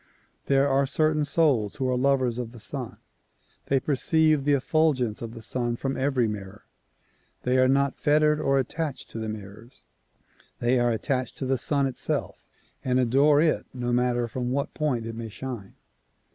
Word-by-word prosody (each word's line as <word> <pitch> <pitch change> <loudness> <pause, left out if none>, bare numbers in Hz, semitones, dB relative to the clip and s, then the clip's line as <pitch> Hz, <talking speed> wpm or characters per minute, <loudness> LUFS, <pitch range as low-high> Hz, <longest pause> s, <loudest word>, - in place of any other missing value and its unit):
There 135 0 +3
are 135 0 +2
certain 155 +1 +1
souls 140 -9 +2
who 130 -2 -1
are 130 - +1
lovers 130 -2 +1
of 120 -1 -5
the 120 - -11
Sun; - - -5 0.7
they 135 - +3
perceive 155 +1 +2
the 145 -1 +4
eft'ulgence 135 -5 +1
of 115 0 -6
the 115 - -9
Sun 120 +1 -1
from 135 +2 -3
every 130 -3 +1
mirror. 105 -1 -7 0.8
They 125 +1 +2
are 130 - +5
not 140 +1 +2
fettered 150 0 +2
or 135 -1 +2
attached 145 +3 -3
to 115 - -6
the 110 0 -3
mir 100 -2 -7
rors; 120 +3 -19 0.7
they 120 +1 +2
are 120 0 +2
attached 125 +2 -2
to 135 - -3
the 130 -1 0
Sun 140 +2 +1
itself 130 -2 -3 0.4
and 130 0 +1
adore 140 +4 +4
it 160 -1 +1
no 120 -1 -2
matter 120 -1 +1
from 125 +1 -3
what 140 +2 -2
point 130 -7 -1
it 115 - -5
may 115 0 -6
shine. 115 -3 -7
130 Hz, 175 wpm, -26 LUFS, 120-140 Hz, 0.8 s, are